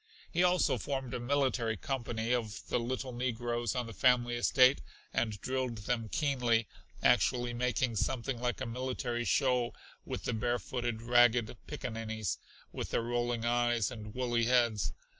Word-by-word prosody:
He 175 - +1
also 180 0 +3
formed 135 -3 -3
a - - -2
military 120 -3 +1
company 120 -1 -2
of 110 -5 -3
the - - +1
little 130 +2 -3
negroes 120 -1 -1
on 125 -1 -1
the 115 - -8
family 125 -1 +3
estate, 130 +2 +5 0.3
and 110 -3 0
drilled 130 -3 -2
them 115 +1 -2
keenly, 120 -6 +1 0.4
actually 120 -1 +3
making 120 -1 0
something 120 +2 -1
like 125 -3 -1
a - - -1
military 120 0 -2
show 125 -3 +2 0.3
with - - -5
the - - -1
barefooted, 120 0 -2
ragged 120 -1 +4
pickaninnies, 110 -3 -3 0.3
with - - -5
their - - 0
rolling 120 -1 -1
eyes 120 -2 +2
and 105 -3 -8
woolly 120 -2 +1
heads. 120 -4 +2
120 Hz, 145 wpm, -32 LUFS, 115-125 Hz, 0.4 s, estate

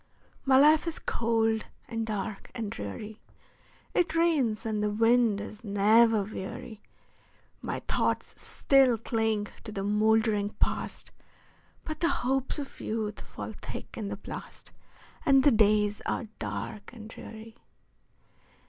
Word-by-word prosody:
My 265 -1 +6
life 305 +4 +6
is 330 - -2
cold, 225 -1 0 0.2
and 225 -1 -3
dark, 210 -1 -4
and 220 -4 -3
dreary; 205 - -6 0.7
It 345 -2 +1
rains, 285 -10 +2
and 215 -1 -1
the 210 - +1
wind 225 0 +3
is 210 +1 -8
never 215 +1 +4
weary; 205 +1 -7 0.8
My - - -3
thoughts - - 0
still 270 -4 +3
cling 220 -2 -1
to 215 - -7
the 195 -2 -3
moldering 210 0 +2
Past, - - -1 0.7
But 310 -1 -5
the 335 - +3
hopes 265 +3 0
of 280 -2 -7
youth 215 -2 -3
fall - - -7
thick - - -8
in 215 -3 -4
the 200 0 -4
blast, - - -9 0.5
And 270 -4 +5
the 290 - +6
days 210 -2 +3
are - - -1 0.2
dark 105 - -5
and 220 -3 -10
dreary. 225 0 -10
220 Hz, 130 wpm, -29 LUFS, 210-245 Hz, 0.8 s, My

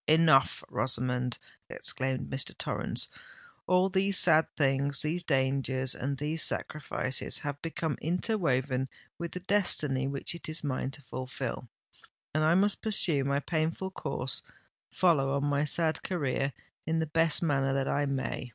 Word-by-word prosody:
enough! 155 -3 +4
Rosamond," 125 0 0 0.3
exclaimed 130 0 -1
Mr. 135 - -2
Torrens: - - -1 0.6
"all 185 +1 +4
these 195 0 +2
sad 160 -2 +6
things—these 140 +4 0
dangers 130 -3 +1
and 135 +2 -3
these 150 +3 -1
sacrifices—have 145 -1 -2
become 160 -2 -3
interwoven 145 - 0 0.3
with 170 -1 -4
the 180 - -5
destiny 155 -9 +1
which 140 +3 -1
it 170 -2 -7
is 155 0 -6
mine 130 -2 -2
to 140 +1 -8
fulfil; 130 0 -5 0.6
and 155 +1 +1
I 160 +2 +4
must 200 +2 +4
pursue 175 -10 +3
my 140 +1 0
painful 165 +5 -2
course—follow 150 -6 -1
on 140 0 0
my 145 0 +1
sad 160 +1 +1
career, 140 -5 -1 0.4
in 160 0 +1
the 160 - +1
best 165 +2 +2
manner 135 -4 +1
that 135 0 0
I 145 0 0
may. 135 -2 -3
145 Hz, 135 wpm, -30 LUFS, 135-165 Hz, 0.6 s, sad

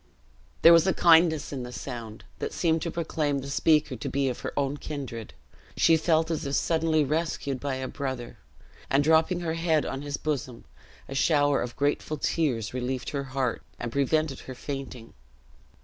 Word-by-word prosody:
There 165 - +10
was 165 +2 +5
a 190 - +2
kindness 165 -3 +4
in 135 - -4
the 125 0 -7
sound, 115 -2 -7
that - - -3
seemed 165 -2 +1
to 170 - -2
proclaim 155 -3 -1
the 140 +1 -5
speaker 150 -1 +2
to 110 - -5
be 140 -1 0
of 125 - -4
her - - -4
own 140 0 0
kindred; 130 -8 -6 0.4
she 165 - +5
felt 160 0 +2
as 165 - -2
if 140 -1 -2
suddenly 160 -2 +2
rescued 145 -2 -2
by 140 -1 -2
a 130 0 -4
brother; 130 -4 -5 0.5
and 140 +1 +3
dropping 160 +3 +3
her 165 -2 -2
head 165 -2 +1
on 135 - -4
his 145 0 -4
bosom, 130 -5 -4 0.4
a - - -7
shower 145 0 +3
of 120 - -5
grateful 145 +2 -1
tears 125 -9 -1
relieved 125 0 -3
her 140 -1 -3
heart, 130 -3 -2 0.2
and 120 -1 -4
prevented 140 +2 +1
her 130 - -9
fainting. 130 -4 -7
145 Hz, 180 wpm, -27 LUFS, 130-160 Hz, 0.5 s, There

